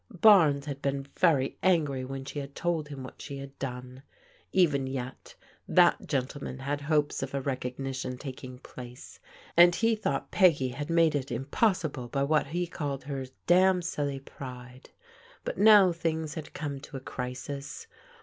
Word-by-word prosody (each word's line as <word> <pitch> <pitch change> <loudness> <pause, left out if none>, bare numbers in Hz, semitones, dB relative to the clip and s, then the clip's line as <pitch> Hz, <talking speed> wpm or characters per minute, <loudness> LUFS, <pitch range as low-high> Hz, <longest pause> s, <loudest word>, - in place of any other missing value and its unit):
Barnes 160 -10 +6
had 140 -2 -5
been 140 0 -1
very 145 -7 +2
angry 150 -8 +2
when 135 +1 -6
she 145 - -5
had 140 0 -8
told 170 -3 -1
him 140 -3 -7
what 130 - -10
she 140 -2 -6
had 135 0 -10
done. 125 -1 -6 0.5
Even 145 -8 +3
yet, 130 -1 -6 0.3
that - - +4
gentleman 135 0 -3
had 140 +2 -3
hopes 150 0 +1
of 135 +1 -4
a - - +1
recognition 130 -1 -3
taking 130 -2 -8
place, 125 -1 -11 0.4
and 175 0 +7
he 225 0 +2
thought 215 - -2
Peggy 160 -9 +4
had 145 +5 -5
made 165 -2 +4
it 140 -2 -2
impossible 155 - 0
by 140 +3 -1
what 150 +1 +2
he 175 +4 -1
called 145 -6 -4
"her 135 -1 -4 0.6
silly 145 -5 -2
pride." 125 -2 -10 0.6
But - - -4
now 205 -3 +8
things 160 -2 -2
had 160 -3 -8
come 145 -3 -4
to 135 - -9
a - - -5
crisis. 130 - -6
140 Hz, 160 wpm, -29 LUFS, 130-160 Hz, 0.6 s, now